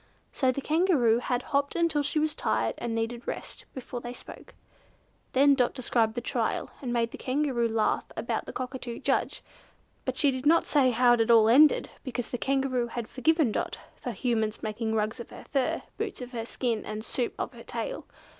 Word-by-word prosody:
So 260 -2 +2
the 275 - -4
Kangaroo 305 -8 +3
had 245 0 -1
hopped 280 0 0
until 335 -3 +2
she 290 +2 -1
was 305 0 +2
tired 110 +1 0
and 235 -1 -2
needed 230 +1 -3
rest, - - -6
before 250 -1 -6
they 240 0 -6
spoke. - - -12 0.8
Then 280 +2 +6
Dot 250 -3 +1
described 235 -3 +1
the 240 - -2
Trial, - - -1
and 250 -3 -3
made 235 -1 +1
the - - -9
Kangaroo 255 -3 0
laugh 225 -1 +1
about - - -2
the - - -5
Cockatoo 255 -2 -5
judge, - - -1 0.6
but - - -3
she 285 -3 +4
did 260 +2 -2
not 335 +2 +5
say 275 -4 +4
how 245 0 +5
it 240 - +2
had 225 +1 +2
all 225 -2 +7
ended 285 +6 +5
because 245 -3 -4
the 245 - -4
Kangaroo 265 -3 0
had 235 -1 -5
forgiven 310 0 +2
Dot - - -2 0.2
for 250 - -6
Humans 225 -2 -1
making 220 +1 -2
rugs 215 +3 -1
of 235 - -8
her - - -11
fur, 270 -3 +1 0.2
boots 430 -3 -3
of 250 -1 -7
her 230 -2 -4
skin, 235 -4 -1
and 215 +1 -6
soup 245 -2 -2
of - - -4
her - - -11
tail. - - -5
245 Hz, 200 wpm, -28 LUFS, 230-275 Hz, 0.8 s, all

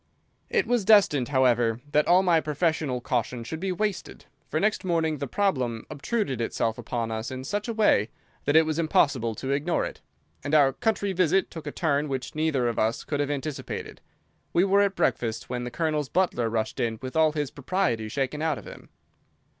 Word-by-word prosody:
It - - +2
was 245 -3 +1
destined, 190 - +5
however, 120 -4 +2
that 150 0 +3
all 180 +2 +5
my 170 -3 +3
professional 150 -4 -1
caution 120 0 -2
should 160 +7 -6
be 190 +2 -2
wasted, 205 0 -3 0.2
for - - 0
next 215 0 +1
morning 165 -4 0
the 140 - -3
problem 130 - -1
obtruded 145 - -2
itself 115 0 -1
upon 115 -1 -3
us 110 +1 -3
in 130 0 -6
such 205 - -3
a 230 - -2
way 165 - +3 0.4
that 145 - +1
it 160 0 +7
was 155 +1 -2
impossible 140 -8 +2
to 135 +4 -4
ignore 145 +5 0
it, - - -8 0.4
and 145 +2 0
our 140 -3 +5
country 215 -4 -1
visit 185 +1 +2
took 160 -3 -8
a - - -3
turn 150 -3 0
which 135 -2 -4
neither 155 -5 +1
of 115 - -1
us 110 +1 0
could 145 - -3
have 145 -1 0
anticipated. 145 0 -5 0.5
We 175 - +4
were 200 +1 +4
at 200 -1 +1
breakfast 115 +1 -1
when 125 -1 -3
the - - -3
Colonel's 155 -1 -1
butler 165 -11 +1
rushed 110 -1 -2
in 115 -1 -1
with 130 +2 -6
all 160 -1 +4
his 150 -3 -2
propriety 140 - -1
shaken 140 +4 -2
out 160 -3 0
of - - -10
him. - - -12
145 Hz, 195 wpm, -26 LUFS, 125-175 Hz, 0.5 s, it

